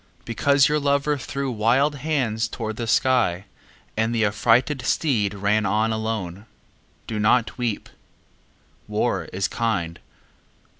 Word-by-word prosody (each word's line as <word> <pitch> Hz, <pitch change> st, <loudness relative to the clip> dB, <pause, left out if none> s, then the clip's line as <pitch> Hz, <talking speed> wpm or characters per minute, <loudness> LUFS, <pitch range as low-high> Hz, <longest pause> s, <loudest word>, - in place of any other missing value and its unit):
Because 140 Hz, +4 st, +3 dB
your 150 Hz, 0 st, +1 dB
lover 140 Hz, +1 st, +1 dB
threw 140 Hz, 0 st, -4 dB
wild 125 Hz, +7 st, +2 dB
hands 125 Hz, -7 st, -1 dB
toward 110 Hz, -1 st, -5 dB
the 115 Hz, -, -3 dB
sky 110 Hz, -7 st, +2 dB, 0.5 s
And 110 Hz, +2 st, 0 dB
the 110 Hz, -2 st, +2 dB
affrighted 120 Hz, +6 st, +2 dB
steed 105 Hz, -10 st, 0 dB
ran 100 Hz, +2 st, +1 dB
on 110 Hz, +3 st, +1 dB
alone, 110 Hz, -3 st, -4 dB, 0.6 s
Do 110 Hz, -2 st, -4 dB
not 110 Hz, +1 st, +2 dB
weep. 120 Hz, -4 st, -2 dB, 1.0 s
War -, -, -1 dB
is 95 Hz, 0 st, -2 dB
kind. 90 Hz, -8 st, -2 dB
115 Hz, 120 wpm, -23 LUFS, 105-130 Hz, 1.0 s, Because